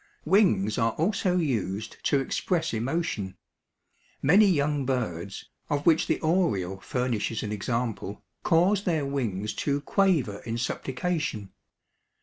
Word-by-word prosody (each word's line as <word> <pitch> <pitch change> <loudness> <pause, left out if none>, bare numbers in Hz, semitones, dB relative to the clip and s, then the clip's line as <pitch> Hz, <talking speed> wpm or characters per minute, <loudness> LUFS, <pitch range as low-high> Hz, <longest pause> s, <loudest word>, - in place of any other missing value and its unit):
Wings 110 - +3
are 115 -1 +2
also 180 +1 +1
used 110 - -2
to 140 - +3
express 165 +4 -1
emotion. 115 - -2 0.8
Many 195 +9 +6
young 145 -5 +1
birds, 100 -8 -3 0.2
of 145 -1 -1
which 160 -2 +4
the - - +1
oriole 130 - +1
furnishes 115 -1 -2
an 105 - -3
example, 110 -1 -3 0.2
cause 185 +4 +3
their 160 -5 +1
wings 110 -7 -2
to 140 -1 0
quaver 150 - +1
in 115 0 -4
supplication. 125 - -2
130 Hz, 120 wpm, -27 LUFS, 105-165 Hz, 0.8 s, Many